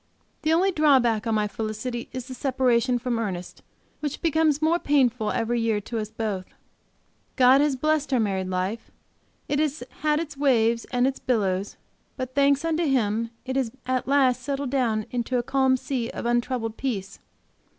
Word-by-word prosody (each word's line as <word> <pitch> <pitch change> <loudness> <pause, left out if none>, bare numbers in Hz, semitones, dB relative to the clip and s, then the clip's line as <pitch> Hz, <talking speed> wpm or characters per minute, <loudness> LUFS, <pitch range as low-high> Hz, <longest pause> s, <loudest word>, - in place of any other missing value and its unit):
The 310 +1 +1
only 365 +4 +3
drawback 260 - +3
on 225 - +1
my 210 -1 +1
felicity 220 +3 -4
is 255 -2 -5
the 260 - -8
separation, 255 -1 +1
from 240 -1 -2
Ernest, 185 -5 -5 0.4
which 295 -1 -4
becomes 315 -2 +2
more 320 +2 +2
painful 250 -8 +2
every 235 +1 0
year 225 -2 +1
to 225 +2 -4
us 215 -1 -4
both. 215 -4 -3 0.9
God 260 +1 +6
has 295 -2 +2
blessed 305 +2 0
our 255 - +3
married 190 -4 -1
life; 185 +5 -3 0.6
it 285 - 0
has 300 -3 -1 0.2
had 300 0 +2
its 310 -3 -5
waves 235 -5 +2
and 245 -1 +1
its 270 0 -1
billows, 200 -5 -1 0.4
but, 255 -1 -4
thanks 280 +2 +3
unto 330 +1 +1
Him, 230 -4 +1 0.2
it 260 0 -3
has 265 -4 +1 0.2
at 255 0 -1
last 260 -3 +3
settled 275 0 -3
down 230 -6 +1
into 245 +1 -1
a 240 - 0
calm 265 0 +2
sea 250 -2 -3
of - - -6
untroubled 240 -1 -1
peace. 210 -8 -4
250 Hz, 170 wpm, -25 LUFS, 225-280 Hz, 0.9 s, God